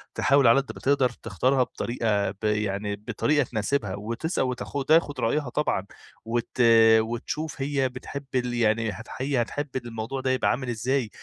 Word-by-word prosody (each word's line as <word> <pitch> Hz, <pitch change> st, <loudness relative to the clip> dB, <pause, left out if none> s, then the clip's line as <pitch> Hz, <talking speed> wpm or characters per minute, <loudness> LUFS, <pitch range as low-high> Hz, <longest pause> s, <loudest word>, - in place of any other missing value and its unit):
تحاول 140 Hz, -3 st, +4 dB
على 115 Hz, +4 st, +6 dB
قد 135 Hz, -, -8 dB
ما -, -, -9 dB
تقدر 135 Hz, -2 st, +3 dB
تختارها 125 Hz, +4 st, 0 dB
بطريقة 110 Hz, -5 st, -1 dB
ب 100 Hz, -, -15 dB
يعني 105 Hz, -1 st, -1 dB
بطريقة 120 Hz, +8 st, 0 dB
تناسبها، 110 Hz, -3 st, -2 dB
وتسأل 115 Hz, -, -2 dB
وتاخ 130 Hz, +2 st, -3 dB
تاخد 155 Hz, -2 st, +3 dB
رأيها 130 Hz, +3 st, 0 dB
طبعًا، 120 Hz, -9 st, -1 dB, 0.4 s
وت 120 Hz, +1 st, -3 dB, 0.4 s
وتشوف 125 Hz, +7 st, -4 dB
هي 135 Hz, -2 st, 0 dB
بتحب 140 Hz, +2 st, -7 dB
ال 125 Hz, -1 st, 0 dB
يعني 115 Hz, -1 st, +1 dB
هت 110 Hz, +3 st, -9 dB
هي 130 Hz, -1 st, 0 dB
هتحب 145 Hz, +5 st, -3 dB
الموضوع 120 Hz, +1 st, -4 dB
ده 130 Hz, -, 0 dB
يبقى 130 Hz, -, +1 dB
عامل 130 Hz, 0 st, -3 dB
إزاي؟ 120 Hz, +1 st, -1 dB
120 Hz, 160 wpm, -26 LUFS, 110-140 Hz, 0.4 s, على